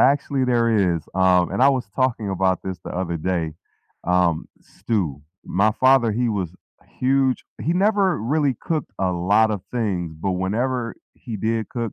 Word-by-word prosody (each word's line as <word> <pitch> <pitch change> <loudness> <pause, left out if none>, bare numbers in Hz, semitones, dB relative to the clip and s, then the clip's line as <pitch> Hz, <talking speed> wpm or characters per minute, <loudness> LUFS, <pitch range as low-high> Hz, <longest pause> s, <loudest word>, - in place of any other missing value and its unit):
actually, 140 -1 +3
there 115 -7 +2
is, 80 - -6
um, 90 -1 +3
and - - +1
I 135 - +7
was 130 -5 0
talking 120 -6 0
about 95 -1 +1
this 95 -2 -4
the - - -6
other 90 -2 -2
day, 85 -1 -1 0.5
um, 90 -2 +1
stew. 90 - -3 0.2
My 100 +4 +2
father, 130 -1 +4
he 120 +2 0
was 95 -5 -2 0.4
huge 130 0 +2 0.2
he 165 - 0
never 200 0 +3
really 135 +3 +1
cooked 155 -4 -2
a 95 -1 +1
lot 100 +6 +3
of 105 -3 -2
things, 95 -9 -2
but 95 +1 0
whenever 115 +6 -1 0.2
he 115 -4 -7
did 110 +2 -1
cook, 115 -3 -4
110 Hz, 165 wpm, -22 LUFS, 95-130 Hz, 0.5 s, I